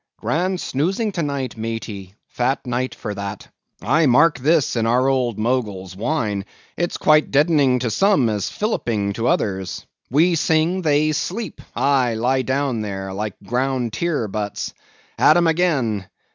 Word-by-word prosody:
Grand 180 +2 -1
snoozing 190 - -1
to 180 - -3
night, 140 -4 -3
maty; 110 -4 -6
fat 130 +3 -1
night 125 +1 -2
for 105 - -5
that. 100 0 -6 0.4
I 150 +6 +3
mark 150 +5 +4
this 150 +1 +2
in 115 -1 +1
our 125 +3 +3
old 125 -5 +1
Mogul's 105 -6 -2
wine; 105 -4 -1 0.3
it's 175 0 -2
quite 155 0 +4
as - - -19
deadening 145 -3 +3
to 120 -3 -1
some 195 - +3
as 105 -2 -1
filliping 115 - -1
to 115 +3 -2
others. 95 -5 -1 0.2
We 160 +7 +3
sing; 165 +3 +1
they 155 -1 +2
sleep—aye, 140 - -1
lie 130 +4 +1
down 130 -3 -1
there, 95 -2 -5
like 105 0 -4
ground 125 0 -1
tier 150 -3 -1
butts. 105 0 -4 0.5
At 155 - +6
'em 175 - +3
again! 145 - +1
130 Hz, 150 wpm, -21 LUFS, 110-155 Hz, 0.5 s, At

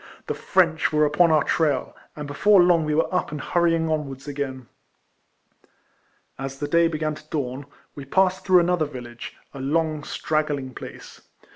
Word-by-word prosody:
The - - -2
French 170 -4 +1
were 150 0 +3
upon 160 +4 +3
our 155 -2 +4
trail, 150 -6 0 0.2
and 150 - -6
before 195 +8 +4
long 175 -2 +4
we 150 0 0
were 160 - 0
up - - 0
and 150 - -5
hurrying 165 0 +1
onwards 145 -3 -3
again. 135 -3 -4 1.7
As 135 0 -5
the 145 - -3
day 170 +2 +4
began 155 -1 -2
to 150 0 -13
dawn, 135 -1 -4 0.3
we 140 - -9
passed 185 +5 +2
through 185 -2 +5
another 175 -2 +1
village 120 -4 -9
— - - -41
a 140 - -8
long, 155 +2 -1
straggling 145 -5 -2
place. - - -10
150 Hz, 165 wpm, -24 LUFS, 140-165 Hz, 1.7 s, through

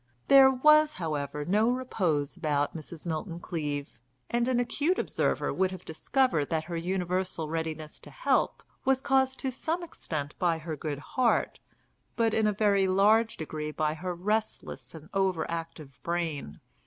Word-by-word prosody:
There 270 -1 +9
was, 305 +4 +5
however, 150 -3 -3
no 210 +7 +3
repose 185 - 0
about 150 -4 0
Mrs. 160 +1 -8
Milton 165 +1 -3
Cleave, 145 -7 -4 0.3
and 240 0 +1
an 255 -2 +2
acute 290 +9 0
observer - - 0
would 190 0 +1
have 185 -1 -9
discovered 160 - +1
that 160 -1 0
her 170 +2 -6
universal 180 -1 -1
readiness 160 -1 -4
to - - -13
help - - 0 0.2
was 265 -1 +3
caused 265 -1 +2
to 265 - -1
some 325 +7 -2
extent 150 - -5
by 170 -2 +2
her 160 0 -5
good 150 -1 -4
heart, 240 - 0 0.6
but 230 -1 +2
in 220 -1 +3
a - - +3
very 200 -2 +2
large 215 +4 +3
degree 155 -1 -4
by 155 0 -1
her 180 +2 -4
restless 185 - -3
and 160 -1 -11
over 190 -4 +1
active 160 -5 -7
brain. 165 - -3
175 Hz, 155 wpm, -29 LUFS, 155-230 Hz, 0.6 s, There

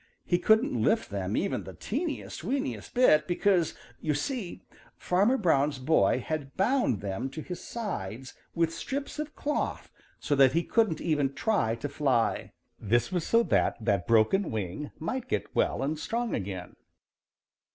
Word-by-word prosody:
He 175 - +2
couldn't 220 - +3
lift 225 - +1
them 100 0 -2
even 200 - -1
the - - -10
teeniest, 290 - -4
weeniest 270 - -3
bit 155 -12 +5
because, 180 -1 +2 0.3
you 150 -2 0
see, 210 - -4 0.3
Farmer 200 +9 +2
Brown's 150 - +2
boy 130 +5 +2
had 150 -4 -4
bound 225 - +2
them 100 +6 -3
to 155 +4 -7
his 180 -1 -7
sides 130 - -5 0.2
with 165 -1 +1
strips 275 - -4
of 305 0 -5
cloth 295 +1 -2 0.3
so 150 - -1
that 135 -2 +5
he 170 +1 +2
couldn't 215 -5 +1
even 145 -4 +1
try 195 - +1
to 115 +5 -4
fly. 135 -5 0 0.3
This 120 - +1
was 175 -3 -1
so 230 0 +4
that - - +2
that 100 -3 +1
broken 115 - +3
wing 110 +7 -4
might 250 +10 -4
get - - -2
well - - +1
and 150 +2 -2
strong 235 +4 -2
again. 95 -3 -5
160 Hz, 155 wpm, -28 LUFS, -, 0.3 s, bit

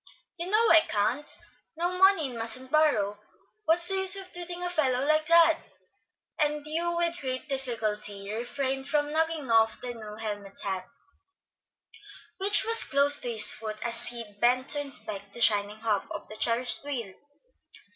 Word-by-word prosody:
"You 345 +2 -4
know 445 +3 +3
I 330 - +8
can't! 220 +4 -2 0.5
No 350 +2 -2
money, 380 -6 +3
and - - -9
mustn't 255 +3 -2
borrow. 215 -10 +1 0.5
What's 340 +2 +5
the 385 +2 +1
use 380 0 +6
of 385 -1 -4
twitting 350 0 -4
a 355 - +1
fellow 270 -6 0
like 310 +1 +1
that?" 330 -1 +4 0.7
and 300 0 0
Hugh 340 +3 -2
with 340 0 -1
great 260 +1 -4
difficulty 215 -6 -4
refrained 265 +3 -4
from 290 0 0
knocking 320 -4 -1
off 225 -1 +2
the 245 -1 -6
new 215 -2 -10
helmet 205 -2 -7
hat 190 -2 -5 1.5
which 405 +2 +5
was 455 0 +2
close 285 +1 +3
to 245 - -4
his 215 -2 +5
foot 215 -1 -7
as 235 - -2
Sid 230 -3 -5
bent 250 +3 +1
to 290 - +4
inspect 200 -8 -2
the - - -6
shining 210 -1 +2
hub 215 -3 -1
of - - -8
the 215 - -9
cherished 235 +4 +2
wheel. 240 -9 -5
265 Hz, 165 wpm, -27 LUFS, 220-325 Hz, 1.5 s, I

